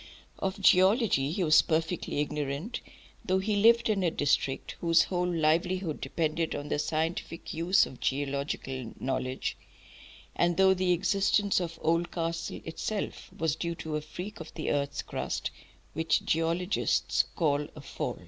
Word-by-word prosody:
Of 190 +1 -2
geology 190 - +4
he 180 +4 -1
was 155 -2 +6
perfectly 160 -2 -1
ignorant, 150 - -3 0.4
though 185 - +1
he 205 +2 0
lived 230 +3 +5
in 210 -3 +1
a 175 - +3
district 145 -3 0
whose 165 -1 +5
whole 180 -1 -1
livelihood 170 +1 +1
depended 160 0 -1
on 145 - -5
the - - 0
scientific 165 +2 -2
use 175 +5 +3
of 130 - -11
geological 135 -3 -2
knowledge, 130 0 -2 0.8
and 175 0 +2
though 190 0 +6
the 185 -1 +1
existence 200 +3 +2
of 170 -2 -4
Oldcastle 165 0 -1
itself 200 +6 -4
was 160 -3 -1
due 170 0 -3
to 160 -1 -5
a 150 - -1
freak 180 +7 -8
of 160 -1 -8
the 155 - -2
earth's 140 0 -1
crust - - -3 0.4
which 160 +1 +1
geologists 170 +4 +1
call 145 -3 +1
a 150 - -9
"fault." - - -4
165 Hz, 145 wpm, -29 LUFS, 150-185 Hz, 0.8 s, was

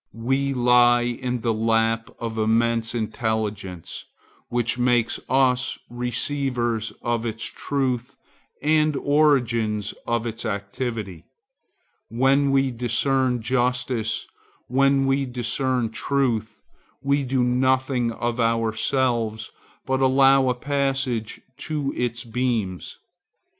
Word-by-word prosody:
We 135 +2 0
lie 120 -1 +5
in 125 0 -3
the 115 -1 +1
lap 115 +1 +1
of 115 -2 -4
immense 115 +1 +1
intelligence, 110 -5 -3 0.4
which 120 0 -1
makes 120 -2 +2
us 130 -1 +2
receivers 120 -2 -1
of 120 -1 -1
its 110 -1 -4
truth 130 -4 -2 0.5
and 155 0 +3
organs 120 -8 +1
of 120 0 0
its 115 0 -4
activity. 100 - -4 0.8
When 135 +4 +3
we 135 -1 +2
discern 125 +1 +1
justice, 125 -2 0 0.4
when 135 +1 +3
we 135 0 +1
discern 125 -1 -1
truth, 115 -2 -1 0.5
we 140 +1 +2
do 130 -1 0
nothing 130 0 +1
of 120 +1 -3
ourselves, 115 0 0 0.3
but 130 0 0
allow 135 0 +5
a 125 - +1
passage 135 -4 -1 0.2
to 145 -2 -3
its 120 -1 -2
beams. 115 -6 -2
120 Hz, 100 wpm, -23 LUFS, 115-135 Hz, 0.8 s, lie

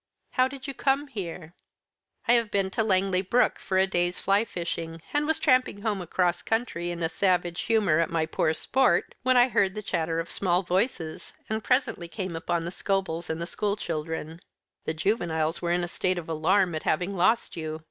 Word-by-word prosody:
"How 255 -1 +3
did 265 0 -9
you 275 - -4
come 275 +1 +1
here?" 175 -6 -6 0.7
"I 240 - +6
have 230 -3 +3
been 195 -2 0
to 225 - 0
Langley 190 -3 +2
Brook 230 +5 +2
for 190 - -1
a 190 - +5
day's 175 -1 0
fly 200 +2 +3
fishing, 165 -3 -5
and 295 0 +1
was 320 0 +1
tramping 255 -8 +2
home 210 -4 0
across 175 0 0
country 225 -7 -1
in 170 -1 -4
a - - +3
savage 175 -1 +1
humour 205 -8 +2
at 165 - +1
my 165 -1 0
poor 160 0 0
sport, 265 +8 +2
when 255 0 +3
I 245 +1 +6
heard 195 -4 +2
the 215 - -5
chatter 165 -3 -1
of 165 - -4
small 180 -1 +1
voices, 180 -3 -2 0.2
and 220 0 -1
presently 250 -9 +1
came 185 -1 -5
upon 165 +1 -1
the 170 - -4
Scobels 185 -4 -2
and 160 0 -2
the 170 - -2
school 200 +3 -1
children. 160 -1 -4 0.5
The 160 - -1
juveniles 165 -3 0
were 170 -1 -1
in 175 0 +2
a - - -2
state 185 +1 -1
of 170 - -5
alarm 175 +3 +2
at 155 - -2
having 180 +5 0
lost 200 +6 +2
you. 155 -1 -4
185 Hz, 200 wpm, -27 LUFS, 165-220 Hz, 0.7 s, I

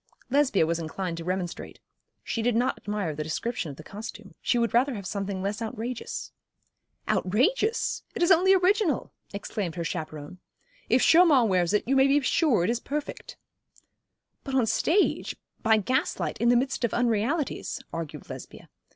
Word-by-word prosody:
Lesbia 270 - +3
was 165 +1 -1
inclined 170 +2 -4
to 165 - -5
remonstrate. 180 0 -4 0.4
She 230 - -2
did 240 0 +1
not 245 +2 +2
admire 205 -6 -3
the 155 +1 -4
description 170 +3 -3
of 140 - -9
the 155 - -10
costume, 210 0 -9
she - - +1
would 235 -1 +1
rather 250 +2 +3
have 200 -2 -7
something 195 -1 -3
less 205 +3 -2
outrageous. 225 +2 -5 0.8
'Outrageous! 420 - +1
It 355 - 0
is 345 - +4
only 375 +2 +6
original,' 370 - +1 0.2
exclaimed 200 -3 -4
her 170 - -3
chaperon. 155 0 -6 0.5
'If - - +4
Chaumont 310 -9 +6
wears 180 -3 +2
it 210 +2 +1
you 270 - +2
may 265 0 +5
be 280 +1 +4
sure 255 - +2
it 205 - +2
is 235 - -1
perfect.' 290 +3 -5 1.1
'But 270 - -4
on 260 - +5
the - - +1
stage, 340 - +1 0.3
by 220 -1 +4
gaslight, 255 - -1
in 235 - +4
the 245 - +5
midst 260 +1 -1
of 235 - 0
unrealities,' 245 +6 0
argued 165 -2 -6
Lesbia. - - -10
225 Hz, 170 wpm, -27 LUFS, 185-270 Hz, 1.1 s, only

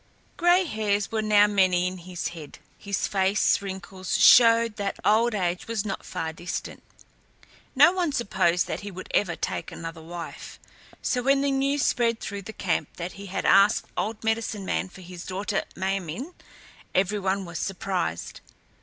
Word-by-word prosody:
Gray 350 +2 +4
hairs 210 -6 -1
were 220 -1 0
now 210 -1 +5
many 185 -3 +2
in 185 0 -3
his 175 0 -5
head. 160 -4 -10 0.2
His 200 -2 -2
face 195 +1 +2
wrinkles 190 -1 -4
showed 230 -2 +6
that 200 -1 -3
old 225 +2 +3
age 180 -2 -2
was 225 -2 -2
not 195 -2 -4
far 165 -3 -4
distant. 175 +3 -6 0.9
No - - +7
one 360 -4 0
supposed 190 -8 +1
that - - -4
he 205 - -7
would 185 -1 -9
ever 180 -4 +2
take - - -4
another 165 0 -7
wife; 170 +1 -8 0.5
so 250 - 0
when 275 +2 +3
the 280 0 +1
news 275 +1 +1
spread 230 -2 +1
through 200 0 -5
the 200 - -8
camp 190 -5 -1
that 175 +1 -5
he 200 0 -10
had 190 - -3
asked 200 +2 +5
the - - -1
old 220 +1 -5
medicine 220 -2 -1
man 185 - -1
for 190 - -13
his 180 -1 -9
daughter 195 +2 -2
Ma 190 - -3 0.2
min´, 220 - -6 0.6
every 195 +3 +2
one 195 0 -1
was 170 -2 -6
surprised. 185 - -3
200 Hz, 170 wpm, -26 LUFS, 180-225 Hz, 0.9 s, No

